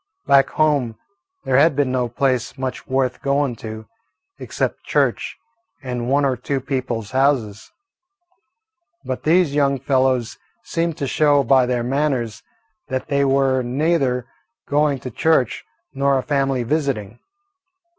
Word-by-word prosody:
Back 140 -1 +5
home 140 -8 +1 0.5
there 130 -1 +2
had 150 +1 +4
been 140 -2 +1
no 125 -2 0
place 130 +1 -1
much 130 -1 -5
worth 130 -1 -1
going 140 -2 0
to, 110 0 -8 0.5
except - - -3
church - - 0 0.5
and 125 -2 -3
one 140 +1 +3
or 130 -2 +1
two 135 +3 -3
people's 125 -5 -3
houses. 130 -6 0 1.4
But 130 - -3
these 165 -2 +3
young 140 -2 +2
fellows 130 -3 0 0.2
seemed 165 -1 -2
to 140 - -2
show 145 +1 +3
by 130 0 +4
their 125 -1 0
manners 130 -3 -1 0.5
that 130 -1 -4
they 140 0 +2
were 135 -1 +2
neither 130 -1 0 0.4
going 145 -1 +2
to 125 - -6
church 145 -1 +1 0.3
nor 140 0 +2
a 130 - -2
family 135 -3 0
visiting. 120 -6 -2
135 Hz, 135 wpm, -21 LUFS, 125-140 Hz, 1.4 s, Back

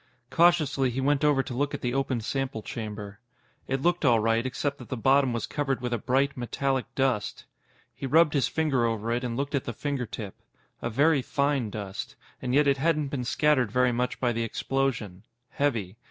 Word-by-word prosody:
Cautiously, 155 -6 +3
he 125 +2 -3
went 140 +2 +1
over 145 -3 +3
to 130 - -6
look 145 +3 -1
at - - -7
the 120 -1 -1
open 135 -3 0
sample 130 -1 -3
chamber. 105 -2 -6 0.5
It 135 0 -1
looked 175 0 +2
all 120 -5 +5
right, 115 +1 +2
except 140 +2 -2
that - - -11
the 130 - -3
bottom 135 +2 +3
was 115 -1 -2
covered 135 -3 -1
with 125 0 -3
a 120 - 0
bright, 135 +5 +1
metallic 130 +1 -1
dust. 130 -6 0 0.5
He 135 - -5
rubbed 160 +2 +5
his 140 -4 +2
finger 150 -6 +1
over 115 0 -2
it 120 +2 0
and 120 -1 -3
looked 140 +2 -2
at 140 - 0
the 120 - -4
fingertip. 120 -6 -4 0.5
A 115 - -2
very 140 +5 +3
fine 140 -3 0
dust. 100 -2 -6 0.3
And 125 - -2
yet 145 +1 +5
it 140 -1 +3
hadn't 150 -1 +1
been 130 -3 -3
scattered 130 -4 +2
very 125 +1 +3
much 125 +1 -1
by 125 -2 +1
the 115 0 -2
explosion. 115 -5 -2 0.3
Heavy. 115 -9 -1
130 Hz, 195 wpm, -27 LUFS, 115-140 Hz, 0.5 s, all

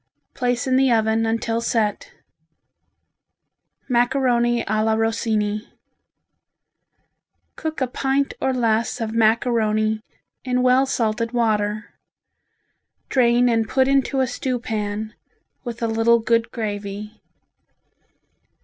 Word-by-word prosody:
Place 245 -1 -1
in 260 -1 +2
the 265 -1 +3
oven 225 0 +2
until 230 0 -1
set. 220 -3 -1 1.8
Macaroni 240 -1 +2
a 215 +1 +1
la 220 0 +2
Rossini 220 -1 -1 1.9
Cook 315 -3 -5
a - - +3
pint 270 +2 -1
or 265 - +1
less 230 -2 0
of 225 -1 -3
macaroni 220 -1 +1 0.4
in 250 -1 0
well 255 +2 +4
salted 230 -1 -1
water; 215 -2 -1 1.2
drain 245 -1 +3
and 225 -3 +1
put 265 -1 +2
into 275 0 +2
a - - +3
stew 255 +1 -2
pan, 215 -2 -4 0.5
with 240 -2 -6
a - - +2
little 225 +1 +3
good 230 0 +1
gravy. 205 -1 -5
230 Hz, 105 wpm, -22 LUFS, 220-250 Hz, 1.9 s, well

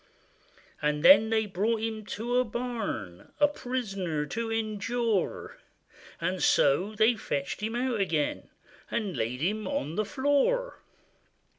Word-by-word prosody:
And 150 0 0
then 220 -6 +8
they 220 -1 +2
brought 210 +4 0
him 220 -1 -3
to 240 +3 -2
a - - +4
barn, 225 - -5
A 295 - +6
prisoner 195 - -3
to 225 +8 -3
endure; 225 -1 -1 0.6
And 180 +2 -2
so 190 +10 +3
they 220 +3 +4
fetched 140 -5 -3
him 220 +2 -2
out 245 -2 0
again, 165 -7 -1 0.4
And 205 -6 -2
laid 120 +4 -2
him 210 +6 -1
on 280 - -2
the 215 - +1
floor. 290 - +1
220 Hz, 130 wpm, -28 LUFS, 185-245 Hz, 0.6 s, then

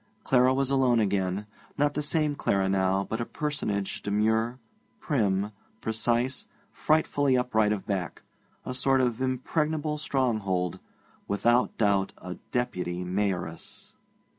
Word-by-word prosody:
Clara 130 0 +4
was 135 0 +1
alone 130 -3 +3
again; 100 -1 0 0.3
not 145 0 +2
the 150 - -1
same 150 0 +1
Clara 100 -8 +1
now, 95 0 +2
but 110 +3 -3
a - - +1
personage 105 -11 -2
demure, 110 +4 +1 0.4
prim, 105 -7 0 0.3
precise, 120 +3 0 0.2
frightfully 145 -4 +2
upright 110 -4 +2
of 105 -3 -2
back 95 -4 -3 0.4
a 130 - -3
sort 135 +1 +2
of 125 -1 0
impregnable 150 +4 -1
stronghold 110 - 0 0.5
without 120 +5 +2
doubt 100 -3 +2
a 90 0 -7 0.2
Deputy 90 -7 -2
Mayoress. 90 -3 -3
115 Hz, 120 wpm, -28 LUFS, 100-130 Hz, 0.5 s, Clara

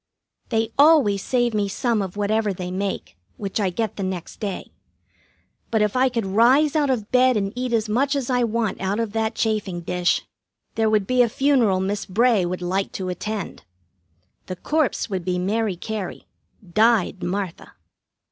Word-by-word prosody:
They 225 -1 0
always 285 -10 +5
save 240 0 0
me 205 -1 +1
some 225 +2 0
of 190 0 -5
whatever 210 0 +1
they 180 0 -5
make, 190 - -4 0.2
which 200 +1 -3
I 200 -3 +1
get 220 +3 -3
the 200 - -3
next 185 -3 -5
day. 200 -3 -5 1.0
But 220 -2 +2
if 210 +2 -1
I 260 +1 +3
could 230 -4 -2
rise 250 +10 +4
out 295 -3 +2
of 225 -5 -1
bed 255 -1 +4
and 200 0 -2
eat 250 0 -3
as 225 -2 +1
much 270 +7 +1
as 270 -4 -2
I 250 -1 +1
want 225 -4 -1
out 195 +3 -1
of 225 -2 -1
that 220 0 -1
chafing 210 -5 -1
dish, 180 +1 0 0.5
there 220 -1 +1
would 215 -2 +2
be 255 +4 +3
a 240 - +3
funeral 245 -7 +2
Miss 200 +2 -2
Bray 215 -1 +3
would 180 0 -4
like 190 +2 -1
to 185 -1 -4
attend. 210 +2 -5 0.8
The 185 - -4
corpse 300 - 0
would 190 -5 -3
be 180 0 -1
Mary 205 +2 0
Cary, 205 +1 -5 0.4
died 215 0 +2
Martha. 190 -1 -4
215 Hz, 175 wpm, -23 LUFS, 190-235 Hz, 1.0 s, always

